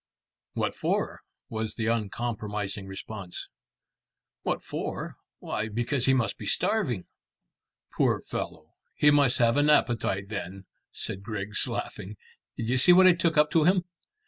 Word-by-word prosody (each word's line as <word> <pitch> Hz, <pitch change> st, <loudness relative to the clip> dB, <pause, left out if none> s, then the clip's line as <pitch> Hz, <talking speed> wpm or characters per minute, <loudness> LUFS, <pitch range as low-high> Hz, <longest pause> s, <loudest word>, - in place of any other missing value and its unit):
"What -, -, -1 dB
for?" -, -, -1 dB, 0.3 s
was 110 Hz, -1 st, -4 dB
the 115 Hz, -, -2 dB
uncompromising 105 Hz, -3 st, -2 dB
response. 95 Hz, -1 st, -7 dB, 0.9 s
"What -, -, -2 dB
for? -, -, -5 dB, 0.2 s
Why, 110 Hz, -, -3 dB
because 120 Hz, +4 st, -1 dB
he 135 Hz, -, +5 dB
must 115 Hz, -6 st, -1 dB
be 105 Hz, -, -6 dB
starving." 125 Hz, -, +1 dB, 0.9 s
"Poor -, -, +2 dB
fellow! 80 Hz, 0 st, -6 dB, 0.2 s
He 150 Hz, -, +5 dB
must 140 Hz, -3 st, +4 dB
have 120 Hz, +1 st, +3 dB
an 145 Hz, +1 st, +4 dB
appetite 110 Hz, -8 st, +2 dB
then," 95 Hz, -2 st, -6 dB, 0.3 s
said 95 Hz, -, -4 dB
Griggs, 105 Hz, -1 st, -3 dB
laughing. 100 Hz, +3 st, -5 dB, 0.4 s
"Did 115 Hz, -, -3 dB
you 130 Hz, +1 st, +2 dB
see 175 Hz, +7 st, +8 dB
what 185 Hz, +1 st, +7 dB
I 185 Hz, -, +8 dB
took 170 Hz, -2 st, 0 dB
up 150 Hz, 0 st, +5 dB
to 160 Hz, -3 st, +4 dB
him?" 180 Hz, +1 st, +4 dB
115 Hz, 145 wpm, -27 LUFS, 100-145 Hz, 0.9 s, see